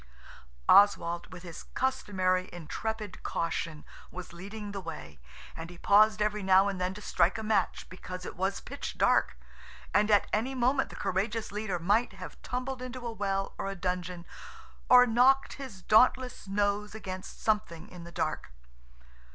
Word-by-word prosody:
Oswald, 175 -4 +4
with 180 -1 -10
his 170 -3 -8
customary 185 -8 0
intrepid 205 +5 -5
caution, 165 -2 -3 0.2
was 180 -2 -9
leading 200 +4 -7
the 200 -1 -5
way, 115 - -8 0.4
and 165 +1 -7
he 175 - -11
paused 215 +3 +5
every 210 0 -1
now 190 +1 +5
and 195 -2 -3
then 185 +1 -1
to 210 - -9
strike 175 +4 +2
a 220 - -5
match 215 -4 0
because 185 0 -8
it - - -7
was 190 +2 -1
pitch - - -7
dark, 60 - +3 0.6
and 210 +1 +3
at 205 -2 +5
any 245 +6 0
moment 260 +2 +2
the - - -10
courageous 210 +4 -2
leader 205 -3 -2
might 205 +7 +1
have 185 -1 -10
tumbled 255 +2 -4
into 255 -1 -6
a 235 - -2
well 195 -2 -2
or 195 - -2
a 195 - -4
dungeon, 180 -1 -3 0.6
or 250 0 +9
knocked 255 +3 +4
his 255 -10 -9
dauntless 250 +1 +3
nose 205 +1 0
against 185 -3 -7
something 210 -7 -1
in 180 -2 -11
the 170 - -10
dark. 170 - -3
200 Hz, 160 wpm, -30 LUFS, 180-220 Hz, 0.6 s, or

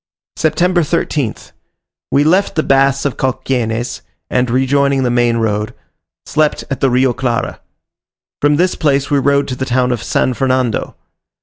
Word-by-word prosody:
September 175 +3 +1
13th. 150 -6 -2 0.6
We 140 - +3
left 185 +6 +2
the 155 - +1
baths 135 0 +2
of 140 - -1
Cauquenes, 125 -3 -2 0.3
and, 125 -1 +1
rejoining 135 +2 +2
the 125 - +1
main 120 -1 +2
road, 105 -1 -1 0.5
slept 155 +1 0
at 135 - -2
the 135 - +2
Rio 130 0 +2
Clara. 120 -3 -2 0.8
From 145 0 +3
this 180 +4 +2
place 140 -2 0
we 145 - +3
rode 140 +1 +2
to 130 - -3
the 130 - -4
town 125 0 +1
of 120 -2 -2
San 130 - 0
Fernando. 130 -2 -1
135 Hz, 150 wpm, -16 LUFS, 125-145 Hz, 0.8 s, We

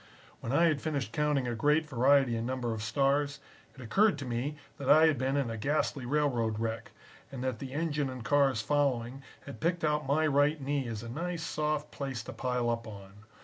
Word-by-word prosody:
When 115 - -5
I 145 +5 +4
had 155 -4 +2
finished 140 -8 -2
counting 150 -4 +1
a 120 - -1
great 150 +7 +2
variety 135 -1 +3
and 115 +1 -2
number 125 -3 -2
of 110 - -5
stars, 140 +5 +1 0.4
it 130 - -12
occurred 195 - +3
to 140 - -6
me 125 +5 -2 0.2
that 140 - -3
I 155 +1 +7
had 155 -5 +2
been 135 +2 0
in 135 -5 0
a 115 - -4
ghastly 140 0 -1
railroad 125 -6 +1
wreck, 115 0 -3 0.4
and 130 -2 -6
that 130 -4 -2
the 135 -2 -6
engine 150 -2 -1
and 130 -2 -7
cars 135 -6 +3
following 135 -3 0 0.2
had 140 - -9
picked 170 +1 0
out 150 -2 0
my 155 +3 +2
right 145 +1 +3
knee 140 -1 -2
as 115 -1 -5
a - - -7
nice 170 +6 -4
soft 150 -1 -2
place 135 -4 -4
to - - -8
pile 125 -2 -1
up 115 0 -3
on. 100 -2 -10
135 Hz, 210 wpm, -30 LUFS, 120-150 Hz, 0.4 s, I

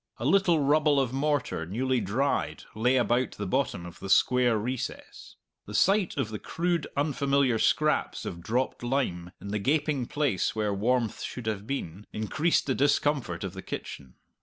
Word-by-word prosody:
A 120 - -5
little 175 +1 +4
rubble 145 0 +3
of 130 -2 0
mortar, 145 - 0
newly 125 +6 0
dried, 120 +9 -1
lay 125 +4 +2
about 125 0 +1
the 105 - -5
bottom 125 -5 -1
of 85 0 -10
the 100 - -7
square 125 +1 +4
recess. 125 +4 -5 0.3
The 105 - -6
sight 195 - +3
of 130 -6 -1
the 105 -1 -5
crude, 170 -2 -1
unfamiliar 140 -4 +2
scraps - - +1
of 85 - -5
dropped 125 +8 -1
lime 120 -9 -1
in 100 - -8
the 105 +1 -1
gaping 140 +1 0
place 140 - 0
where 105 -2 0
warmth 115 +3 0
should 125 - -6
have 105 -1 -3
been, 105 -8 -5
increased 155 +10 +1
the 135 - +1
discomfort 145 -3 +1
of 95 -2 -4
the 95 - -7
kitchen. 65 -8 -7
125 Hz, 165 wpm, -28 LUFS, 105-140 Hz, 0.3 s, little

